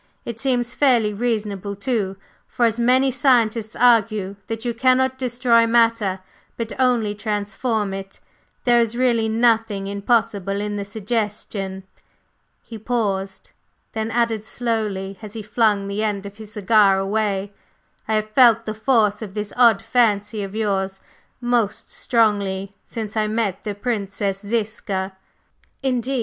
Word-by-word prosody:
It 235 -1 -6
seems 245 -2 0
fairly 240 -7 +3
reasonable 210 -3 -2
too, 200 -3 -2 0.3
for, 240 - +1
as 230 0 0
many 255 +3 +3
scientists 235 -4 +2
argue 215 -5 +3
that 225 +1 -5
you 240 - 0
cannot 260 +2 +2
destroy 240 -2 +3
matter, 230 -5 +2 0.4
but 230 -1 -4
only 240 -5 +2
transform 210 0 -2
it, 195 0 -8 0.4
there 240 -1 +4
is 230 0 0
really 235 -3 +2
nothing 225 -3 +2
impossible 200 -1 0
in 205 0 -3
the 200 -1 -3
suggestion." 205 -2 -3 0.8
He 225 -2 -9
paused, 200 -4 -2 0.4
then 220 0 -2
added 230 -2 0
slowly 210 -5 -3
as 215 -2 -9
he 220 -2 -6
flung 210 -2 +1
the 200 +2 -2
end 205 -2 -2
of 200 +1 -9
his 215 -1 -10
cigar 205 -1 +4
away: 200 0 -1 0.5
"I 220 - +1
have 215 0 -1
felt 230 -2 +5
the 215 - -3
force 215 -2 +2
of 205 -2 -7
this 210 -1 -4
odd 230 -5 +5
fancy 215 -3 +1
of 195 +1 -6
yours 195 -3 -1 0.4
most 240 -4 -1
strongly 200 -4 0
since 220 -2 -6
I 215 -1 +1
met 210 -3 -1
the 210 -2 -4
Princess 200 -3 -2
Ziska." 205 -3 -3 0.7
"Indeed! 260 0 0
215 Hz, 140 wpm, -22 LUFS, 200-235 Hz, 0.8 s, felt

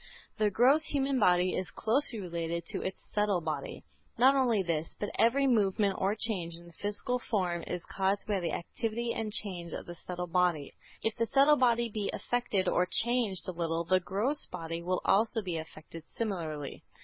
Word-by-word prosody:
The 215 -1 +3
gross 255 +9 +5
human 275 -2 0
body 180 -2 +4
is 185 - -2
closely 235 0 0
related 170 -2 -3
to - - -3
its 190 - -4
subtle 205 -3 +2
body. 155 -4 -4 0.3
Not 260 +3 +6
only 240 -7 +2
this, 165 -2 -2
but 205 - -3
every 265 +5 +4
movement 205 -5 +2
or 195 +2 +2
change 190 -7 -1
in 170 +1 -12
the 170 - -15
physical 205 +7 -2
form 180 -8 -1
is 180 -1 -4
caused 195 +1 0
by 205 -2 0
the 175 - -2
activity 230 +6 -3
and 220 -1 -3
change 180 -6 -3
of - - -5
the 175 - -7
subtle 180 +1 -5
body. 175 -4 +1 0.3
If 225 - 0
the 230 0 +1
subtle 280 +4 +5
body 235 -2 +3
be 210 -2 -3
affected 215 -6 -1
or 180 0 +2
changed 235 -5 +1
a - - -1
little, 165 -1 -1
the 185 +2 +3
gross 210 +11 -1
body 165 0 -5
will 180 +1 -1
also 220 +3 +3
be 180 -3 -3
affected 160 0 -9
similarly. 160 -10 -4
195 Hz, 185 wpm, -31 LUFS, 175-230 Hz, 0.3 s, Not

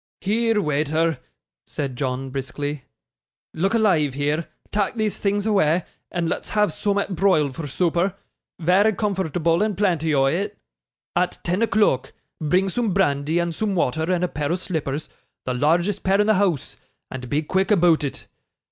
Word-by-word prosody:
'Here, 225 +2 +1
waither,' 155 -1 0 0.5
said 135 -3 -4
John, 130 0 -3
briskly. 140 +1 -4 0.7
'Look 195 +7 0
alive 165 - +2
here. 145 +3 -1 0.2
Tak' 205 +1 0
these 215 -2 -1
things 205 0 0
awa', 180 -6 +2 0.3
and 175 -2 -1
let's - - -3
have 210 -3 +2
soomat 200 -1 -1
broiled 155 -7 +2
for 165 -3 -5
sooper 175 +5 0 0.4
vary 190 +6 +3
comfortable 175 -4 0
and 210 -3 0
plenty 170 -6 +1
o' 135 -1 +4
it 200 +9 -1 0.6
at 180 0 +1
ten 180 +4 0
o'clock. 215 - +2 0.3
Bring 180 +5 +2
soom 210 0 -1
brandy 150 -3 +1
and 170 -1 0
soom 205 +4 -1
wather, 160 +1 0
and 180 -1 +1
a - - +2
pair 150 -2 -3
o' - - +2
slippers 155 -5 -3 0.4
the 125 - -1
largest 170 +9 +1
pair 195 +1 +2
in 210 - +4
the 215 - +4
house 185 -8 0 0.3
and 125 -2 -6
be 150 +4 0
quick 190 +5 0
aboot 175 -6 +4
it. 140 - -5
175 Hz, 160 wpm, -23 LUFS, 150-200 Hz, 0.7 s, o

